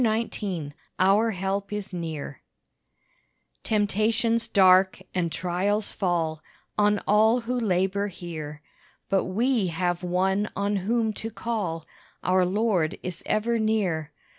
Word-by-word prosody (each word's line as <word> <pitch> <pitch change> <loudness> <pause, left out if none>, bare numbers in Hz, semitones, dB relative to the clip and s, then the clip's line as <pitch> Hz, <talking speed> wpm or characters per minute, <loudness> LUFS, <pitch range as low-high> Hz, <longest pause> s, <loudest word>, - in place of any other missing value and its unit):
Our 200 +5 +4
Help 195 0 -2
Is 210 -2 -5
Near 160 -5 -5 1.2
Temptations 220 +2 +1
dark 190 -2 +5
and 170 -3 0
trials 190 +5 -1
fall 165 -4 -1 0.3
On 210 0 +3
all 220 +4 +4
who 235 +2 -3
labor 195 -1 +1
here; 155 -5 -7 0.5
But 195 -1 +2
we 225 +2 +1
have 175 +1 -1
One 190 +3 +1
on 200 +1 0
whom 220 +3 0
to 225 - -3
call: 200 -8 -3 0.4
Our 185 0 +3
Lord 190 -5 +1
is 180 -2 -5
ever 230 +2 +1
near. 190 -8 0
195 Hz, 115 wpm, -26 LUFS, 180-215 Hz, 1.2 s, dark